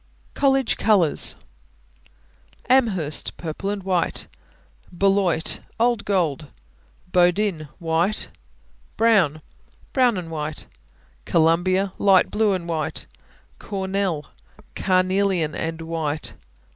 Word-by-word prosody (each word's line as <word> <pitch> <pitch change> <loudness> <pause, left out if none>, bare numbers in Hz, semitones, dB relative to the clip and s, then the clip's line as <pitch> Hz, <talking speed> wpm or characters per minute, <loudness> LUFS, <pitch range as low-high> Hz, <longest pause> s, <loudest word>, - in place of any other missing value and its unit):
COLLEGE 270 -3 +2
COLORS. 195 -8 +2 1.3
Amherst 205 - +1
Purple 170 +4 -4
and 200 -1 -3
white. 180 -3 -1 0.7
Beloit 190 -3 +1 0.2
Old 235 -2 +2
gold, 165 -7 0 0.6
Bowdoin 180 -2 +2
White. 170 +4 0 0.7
Brown 190 -10 +3 0.5
Brown 250 -5 +3
and 170 -3 -6
white. 155 -1 -5 0.6
Columbia 180 +4 +2
Light 195 -2 +4
blue 215 -1 +2
and 175 -2 -3
white. 160 -2 -3 0.5
Cornell 190 -5 -2 0.5
Carnelian 185 -3 +1
and 165 +1 -4
white. 160 -2 -3
185 Hz, 85 wpm, -23 LUFS, 160-200 Hz, 1.3 s, Light